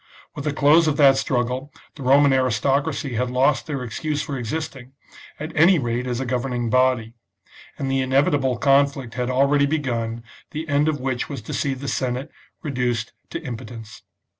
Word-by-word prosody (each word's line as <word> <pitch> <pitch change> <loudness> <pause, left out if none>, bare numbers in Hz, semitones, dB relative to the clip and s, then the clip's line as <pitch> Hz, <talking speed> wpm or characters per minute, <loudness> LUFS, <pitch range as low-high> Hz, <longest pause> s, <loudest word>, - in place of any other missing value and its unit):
With 145 - -7
the 150 - +1
close 150 +4 +4
of 145 -2 +1
that 140 -2 +6
struggle 130 +1 -1 0.2
the 150 - -12
Roman 140 +2 +5
aristocracy 135 +1 0
had 125 +2 -1
lost 130 +3 +2
their 140 -4 -3
excuse 150 +6 -3
for 140 - -4
existing, 130 +1 -5 0.5
at 155 +2 -6
any 170 +4 +6
rate 120 -2 -2
as 120 -1 -2
a 135 - -2
governing 120 -1 -2
body; 125 -3 +2 0.6
and 135 -1 -2
the 135 0 +1
inevitable 130 -1 +2
conflict 140 -2 +2
had 125 0 -2
already 140 +2 +3
begun, 120 -6 -2 0.3
the 155 +1 -5
end 145 0 +2
of 155 -2 0
which 130 -1 -2
was 140 -7 -6
to - - -6
see 140 -2 -1
the 135 +2 -7
Senate 130 +3 -2 0.3
reduced 125 -5 -2 0.2
to - - -4
impotence. 115 -4 -8
135 Hz, 170 wpm, -22 LUFS, 125-145 Hz, 0.6 s, that